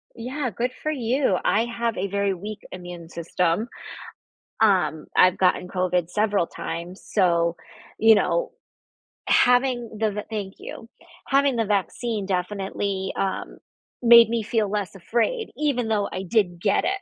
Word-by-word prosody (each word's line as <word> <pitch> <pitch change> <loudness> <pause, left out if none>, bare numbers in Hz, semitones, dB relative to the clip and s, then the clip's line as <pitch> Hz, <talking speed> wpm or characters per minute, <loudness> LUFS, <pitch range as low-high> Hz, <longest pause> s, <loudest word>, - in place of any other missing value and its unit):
Yeah, 255 +3 -3
good 240 +5 -2
for 310 - -1
you. 250 -6 +1
I 225 - +3
have 235 -1 -2
a 190 - -1
very 200 0 0
weak 205 +4 -7
immune 175 -2 -9
system. 170 +5 -1 0.9
Um, 185 -7 +2
I've 185 0 +5
gotten 180 -1 +1
COVID 180 -2 0
several 205 -2 +1
times, 175 +4 -7
so, 170 -4 +2 0.4
you 225 0 +7
know, - - +1 0.8
having 245 -1 +3
th 215 -2 +1
the 210 - -3
Thank 205 -3 -5
you. 225 - -9 0.4
Having 275 -1 +3
the 225 - +1
vaccine 210 +2 -1
definitely, 190 +1 -2
um, 195 -1 -3 0.4
made 235 -1 +8
me 230 -2 -1
feel 215 -2 0
less 205 -2 -3
afraid 240 - -1
even 280 -6 0
though 210 -2 0
I 185 - -4
did 180 -4 0
get 200 - +2
it, 390 +1 -1
210 Hz, 145 wpm, -24 LUFS, 185-235 Hz, 0.9 s, made